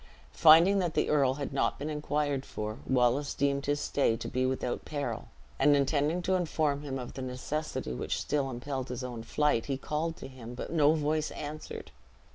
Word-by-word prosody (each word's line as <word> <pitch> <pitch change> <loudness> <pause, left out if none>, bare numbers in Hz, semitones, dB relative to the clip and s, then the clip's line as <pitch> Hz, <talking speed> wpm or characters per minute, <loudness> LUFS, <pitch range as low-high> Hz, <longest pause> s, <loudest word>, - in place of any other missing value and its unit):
Finding 170 +5 +7
that 175 -4 -1
the - - +1
earl 135 -3 +3
had 140 -1 -4
not 135 - +1
been 145 - -4
inquired 150 -2 -1
for, 110 -2 -5
Wallace 130 +3 +2
deemed 140 0 0
his 145 0 +1
stay 135 -6 +1
to - - -5
be 130 0 0
without 130 -1 -2
peril; 140 -7 -4 0.3
and 145 +1 +5
intending 145 +5 +1
to 190 - +1
inform 155 -5 0
him 140 -2 -4
of 125 -2 -6
the 135 - -6
necessity 130 - -3
which - - -2
still 140 -2 0
impelled 130 +1 -4
his 125 +1 -4
own 120 -2 -5
flight, 130 0 +1
he 135 -2 -1
called 155 +4 -2
to - - -8
him, 125 -2 -9
but 125 - -6
no 155 -1 +4
voice 155 0 0
answered. 150 +1 -7
140 Hz, 190 wpm, -30 LUFS, 130-150 Hz, 0.3 s, Finding